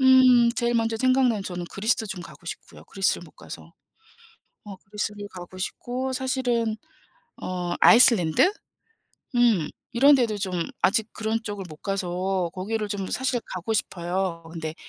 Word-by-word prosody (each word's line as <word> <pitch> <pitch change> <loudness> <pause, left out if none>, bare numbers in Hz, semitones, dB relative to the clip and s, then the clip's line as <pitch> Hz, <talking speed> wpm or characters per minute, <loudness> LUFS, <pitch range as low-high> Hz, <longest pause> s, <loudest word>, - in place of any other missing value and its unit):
음 255 -2 +6
제일 240 -1 0
먼저 225 -1 +1
생각나는 255 -4 +2
저는 180 -2 -5
그리스도 220 +2 0
좀 190 -3 -6
가고 170 - -14
싶고요, - - -9
그리스를 195 0 0
못 - - -16
가서. - - -11 0.9
어 205 -2 -8
그리스를 205 +1 -5
가고 180 +1 -10
싶고 255 +7 -4
사실은 250 -4 0 0.7
어 180 -1 -3
아이슬란드? 230 - +6 0.8
음. 225 -11 +3 0.2
이런 275 +5 +6
데도 230 -5 0
좀 195 -2 -3 0.3
아직 220 +2 +2
그런 220 +1 -1
쪽을 205 -3 -5
못 155 - -11
가서 185 -1 -2
거기를 210 +3 -3
좀 195 -2 -3
사실 255 -1 0 0.2
가고 195 +5 -3
싶어요. 175 -3 -2
근데 160 -1 -5
210 Hz, 300 characters per minute, -25 LUFS, 185-240 Hz, 0.9 s, 음